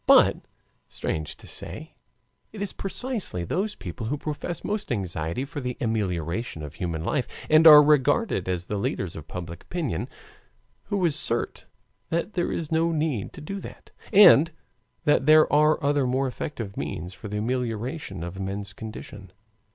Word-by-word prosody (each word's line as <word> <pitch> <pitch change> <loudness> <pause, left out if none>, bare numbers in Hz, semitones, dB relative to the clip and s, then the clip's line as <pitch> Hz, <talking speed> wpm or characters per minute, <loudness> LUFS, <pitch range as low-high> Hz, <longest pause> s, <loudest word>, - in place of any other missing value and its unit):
But, - - +7 0.5
strange 80 -1 -3
to - - -15
say, - - -7 0.6
it 210 - -9
is 205 -2 -3
precisely 200 - -3
those 200 - -1
people 90 +5 -6
who 145 +5 -1
profess 155 +4 -4
most 210 -7 -3
anxiety 90 +1 -2
for 145 0 -6
the 125 -1 -4
amelioration 95 -5 -2
of 75 -1 -7
human 80 -2 -3
life, 130 - 0 0.2
and 155 +1 +8
are 150 -1 +11
regarded 145 - +2
as 90 -1 -2
the 105 - -3
leaders 95 -3 -2
of 80 -1 -9
public 85 -2 -7
opinion, 155 - -3 0.8
who 200 -3 0
assert 150 -7 0 0.4
that 170 +5 -1
there 175 -2 0
is 160 -2 -3
no 165 +1 +2
need 150 - -1
to - - -10
do 195 +7 -5
that, - - -11 0.2
and 170 -6 +8 0.6
that 145 -2 +3
there 155 0 +8
are 150 +1 +5
other 140 -2 +2
more 130 +2 +1
effective 115 -5 -5
means 90 -1 -4
for 105 - -9
the 105 +1 -3
amelioration 115 - -3
of 85 +2 -6
men's 100 +1 -4
condition. 105 -3 -9
125 Hz, 160 wpm, -26 LUFS, 95-160 Hz, 0.8 s, are